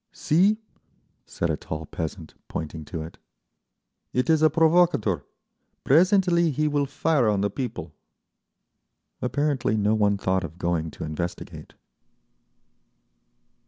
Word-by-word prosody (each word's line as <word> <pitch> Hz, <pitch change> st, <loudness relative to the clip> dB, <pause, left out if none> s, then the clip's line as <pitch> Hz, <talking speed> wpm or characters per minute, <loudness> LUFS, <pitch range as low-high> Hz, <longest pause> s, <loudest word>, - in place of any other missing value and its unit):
"See!" 190 Hz, +8 st, +2 dB, 0.7 s
said -, -, -2 dB
a -, -, 0 dB
tall 80 Hz, 0 st, -6 dB
peasant, 80 Hz, +1 st, -6 dB
pointing 80 Hz, 0 st, -5 dB
to 80 Hz, -1 st, -5 dB
it. 80 Hz, -, -11 dB, 0.9 s
"It 125 Hz, +6 st, +2 dB
is 160 Hz, -1 st, +3 dB
a 155 Hz, -, +6 dB
provocator. 160 Hz, -, +3 dB, 0.6 s
Presently 175 Hz, +2 st, +4 dB
he 150 Hz, +1 st, 0 dB
will 145 Hz, -1 st, 0 dB
fire 140 Hz, -3 st, +1 dB
on 100 Hz, -2 st, +1 dB
the 100 Hz, -1 st, 0 dB
people…." 100 Hz, -, -5 dB, 1.3 s
Apparently 125 Hz, -3 st, 0 dB
no 105 Hz, +1 st, +2 dB
one 105 Hz, -2 st, +2 dB
thought 95 Hz, -1 st, 0 dB
of 85 Hz, 0 st, -7 dB
going 85 Hz, -3 st, -1 dB
to -, -, -8 dB
investigate. 80 Hz, +3 st, -6 dB
110 Hz, 120 wpm, -25 LUFS, -, 1.3 s, a